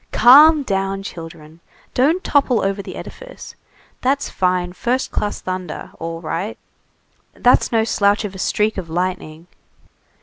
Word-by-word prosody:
"Calm 290 +6 +7
down, 195 -3 -2
children. 165 -3 -10 0.3
Don't 315 +9 +2
topple 270 -6 +2
over 195 +1 -1
the - - -9
edifice. - - -10 0.5
That's 275 +2 0
fine, 180 -1 0
first 245 +7 -2
class 205 -1 -3
thunder; 185 -3 -6
all 165 0 -5
right. 175 +6 -4 0.8
That's 245 - +3
no 225 -2 +2
slouch 205 -1 +1
of 200 - -6
a 190 - -10
streak 210 +2 0
of 170 -3 -8
lightning. 170 -2 -4
195 Hz, 135 wpm, -19 LUFS, 180-245 Hz, 0.8 s, Calm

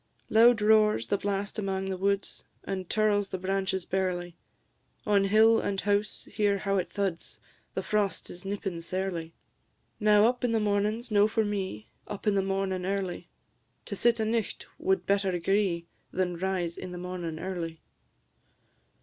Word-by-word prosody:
Loud 225 0 +6
roars 210 - +4
the 200 - 0
blast 200 +1 -2
amang 195 -1 -2
the - - -1
woods, 200 +1 -1 0.2
And 190 -2 -4
tirls 205 -2 +2
the - - -3
branches 190 0 -1
barely; 180 -2 -2 0.7
On 200 -1 +3
hill 220 +3 +5
and 195 -1 -1
house 205 +1 -1
hear 205 -1 +2
how 195 0 0
it 185 - -1
thuds! 195 -4 -3 0.4
The - - -1
frost 210 -2 0
is 175 +1 -9
nippin' 195 -3 -4
sairly. 170 -2 -3 0.6
Now, 210 -1 +5
up 245 +1 +1
in 240 -2 +1
the 225 - +3
mornin's 210 +3 0
no 205 0 +5
for 220 0 +1
me, 190 - -4 0.2
Up 205 -1 -7
in 210 - +3
the 195 - +3
mornin' 195 -1 -1
early; 190 - -3 0.6
To - - -5
sit 235 +3 +2
a' 220 - +1
nicht 225 -1 -2
wad 190 -2 +1
better 195 -1 +2
agree 180 -1 +1 0.3
Than 180 -1 -1
rise 180 -1 -2
in 185 - -6
the - - -6
mornin' 175 -2 -5
early. 170 -3 -5
195 Hz, 160 wpm, -28 LUFS, 185-210 Hz, 0.7 s, Loud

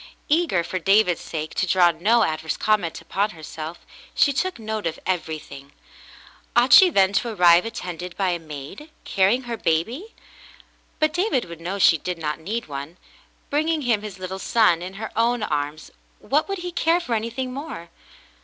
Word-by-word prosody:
Eager, 300 - +2
for 185 +2 -3
David's 195 -1 +3
sake, 155 -1 -5
to 190 - 0
draw 175 -1 +5
no 215 +8 +2
adverse 160 -2 -2
comment 210 -7 0
upon 200 +2 -1
herself, 160 0 -8 0.3
she 280 - +4
took 370 +7 -1
note 220 -3 -3
of 165 - -4
everything. 155 -5 -4 0.8
Ought 245 +1 +5
she 375 - +9
then 195 - +3
to 235 +5 +1
arrive 175 -3 +5
attended 180 -4 -6
by 195 -2 +1
a 175 - -2
maid, 155 - -9 0.2
carrying 200 +6 +2
her 235 -1 -5
baby? 230 - -1 0.8
But 310 -1 +1
David 355 - 0
would 170 -1 -10
know 185 +4 -3
she 170 -4 +5
did 180 +2 -4
not 150 -1 -3
need 215 +8 -4
one; 145 +4 -7 0.5
bringing 310 +1 0
him 230 -4 +1
his 210 -3 -8
little 185 +1 -6
son 190 -5 +3
in 185 +2 -7
her 220 +2 -6
own 235 0 +1
arms, 150 -2 -3 0.3
what 300 +7 0
would 395 - -2
he 355 0 -5
care 335 0 +2
for 260 -9 -4
anything 235 +3 -3
more 270 - -7
195 Hz, 175 wpm, -23 LUFS, 170-245 Hz, 0.8 s, she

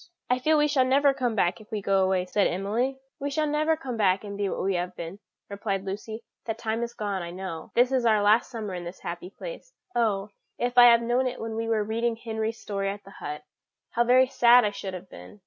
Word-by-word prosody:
"I 250 - +3
feel 310 +4 +3
we 295 0 +4
shall 285 -3 +3
never 275 +2 +4
come 250 -4 -1
back 175 -2 +1
if 215 - -17
we 215 - -1
go 195 -1 +2
away," 185 -1 +1
said 200 +2 +2
Emily. 220 +9 -1 0.2
"We 285 - -2
shall 305 +2 0
never 305 +2 +1
come 260 -6 -5
back 195 -2 +2
and 200 -1 -6
be 200 -1 -1
what - - -3
we 195 +1 +1
have 180 0 -2
been," 170 +4 -7 0.3
replied 200 -1 -3
Lucy; 215 +3 -6 0.2
"that 225 -1 -2
time 225 0 -2
is 235 0 -4
gone, 200 -3 -2
I 170 - -5
know. 180 -2 -6
This 245 +2 +4
is 260 -2 +2
our 215 -3 +3
last 215 +3 +4
summer 220 -5 -5
in 175 -1 -5
this 175 +2 -9
happy 175 +1 -6
place. - - -9 0.2
Oh, 210 -4 +1 0.3
if 245 0 -1
I 245 -1 +9
had 235 -1 +7
known 245 +2 +1
it 255 - -4
when 225 0 -4
we 225 0 -2
were 220 -2 +1
reading 230 +2 -1
Henry's 225 -1 -4
story 195 -1 -2
at 200 +1 -6
the 195 - -14
hut, 150 -4 -7 0.5
how 235 - +2
very 255 +2 +5
sad 245 -2 +5
I 205 - +1
should 195 -2 -6
have 185 +1 -9
been!" 205 - -13
220 Hz, 245 wpm, -26 LUFS, 195-245 Hz, 0.5 s, I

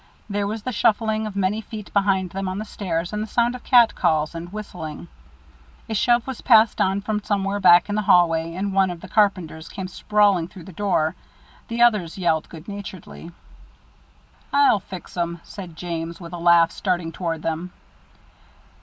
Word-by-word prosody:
There 205 -1 -1
was 215 +1 -4
the 255 - -3
shuffling 220 -1 +1
of 205 - -8
many 200 +2 0
feet 215 -1 -9
behind 195 -2 +1
them 195 0 -4
on 185 +1 -3
the 215 - -4
stairs, 175 -4 -3
and 210 - -2
the 215 - -3
sound 235 +2 +1
of 250 - -9
cat 240 -3 +5
calls 155 0 +1
and 170 +1 -7
whistling. 175 -6 -7 0.8
A 225 - -4
shove 240 +2 +2
was 265 -3 -6
passed 225 -2 +5
on 190 +1 +1
from 210 +1 -2
somewhere 200 0 -1
back 175 -2 +6
in 205 - -3
the 215 - +1
hallway, 165 -3 +3
and 195 +1 -2
one 190 -1 +3
of 175 -2 -7
the - - -9
carpenters 185 -7 0
came 190 -3 -6
sprawling 200 -3 +2
through 180 -1 -12
the 190 - -12
door. 160 -4 0 0.5
The 235 +1 +1
others 210 -9 +2
yelled 165 -4 0
good 165 0 -11
naturedly. 195 -4 -9 1.2
"I'll 280 -7 +4
fix 185 -3 -10
'em," 170 -1 -2
said 180 -5 -10
James, 165 0 -5
with 170 -1 -10
a 175 - -5
laugh, 170 -1 +5
starting 175 -4 -2
toward 165 -2 -4
them. 165 +3 -3
190 Hz, 180 wpm, -23 LUFS, 170-210 Hz, 1.2 s, back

